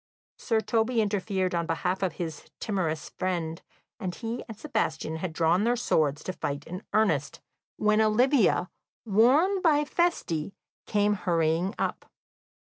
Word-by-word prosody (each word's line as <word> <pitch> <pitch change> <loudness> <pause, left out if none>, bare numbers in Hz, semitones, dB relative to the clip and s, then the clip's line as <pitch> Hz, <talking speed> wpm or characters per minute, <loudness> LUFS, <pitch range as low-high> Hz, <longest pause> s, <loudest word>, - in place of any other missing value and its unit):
Sir 225 -2 +1
Toby 230 +1 +1
interfered 195 -3 0
on 170 -1 -1
behalf 180 +3 -1
of 185 -4 0
his 165 -3 -5
timorous 170 -7 -2
friend, 170 -3 -2 0.4
and 180 -2 -4
he 235 +1 -4
and 225 -3 -8
Sebastian 215 - -2
had 175 +1 -3
drawn 165 +4 +2
their 240 +2 +2
swords 155 - +1
to 185 - -4
fight 145 -4 -4
in 180 +3 -6
earnest, 190 -10 +1 0.4
when 215 +1 +3
Olivia, 220 -3 +3 0.3
warned 270 - +4
by 300 -4 +3
Feste, 200 - 0 0.3
came 210 0 +2
hurrying 170 +1 0
up. - - -3
195 Hz, 135 wpm, -27 LUFS, 165-225 Hz, 0.4 s, warned